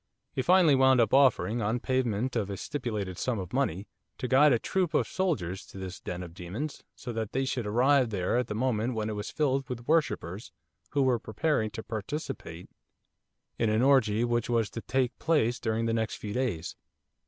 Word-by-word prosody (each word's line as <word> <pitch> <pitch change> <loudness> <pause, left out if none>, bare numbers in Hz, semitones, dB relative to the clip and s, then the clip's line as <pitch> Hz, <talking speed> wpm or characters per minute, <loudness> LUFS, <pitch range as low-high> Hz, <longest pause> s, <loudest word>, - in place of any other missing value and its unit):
He 130 - 0
finally 175 +1 +5
wound 130 -1 +5
up 115 -3 +3
by 135 - +7
offering, 120 -3 +3
on 110 +4 0
payment 125 -1 -1
of 105 -4 -1
a 100 - -4
stipulated 105 -8 -4
sum 125 -3 -1
of 95 -3 -6
money, 110 -8 -1 0.3
to 125 - -3
guide 140 +4 +6
a 120 - +4
troop 175 +5 -1
of - - +2
soldiers 100 - -2
to - - -12
this 95 -1 -6
den 90 0 -5
of 85 -2 -10
demons, 100 - -6
so 120 -2 -7
that 110 -2 -4
they 135 +1 0
should 125 -4 -2
arrive 130 +3 +3
there 95 -2 -1
at 125 - -2
a 105 - -3
moment 120 0 0
when 110 0 -2
it - - -4
was 105 +1 -4
filled 135 -3 0
with 120 -1 -6
worshippers, 120 - 0 0.4
who 140 -1 +3
were 125 -3 +2
preparing 110 +1 0
to 110 - -7
participate 110 - -5 0.9
in 115 - +2
an 110 +3 +2
orgie 120 -5 +4
which 120 -1 0
was 115 -3 +1
to 115 - -5
take 130 0 -1
place 125 -7 +1
during 115 0 -1
the 115 - 0
next 110 -1 -1
few 105 -1 -6
days. 110 -11 -2
120 Hz, 200 wpm, -29 LUFS, 105-130 Hz, 0.9 s, by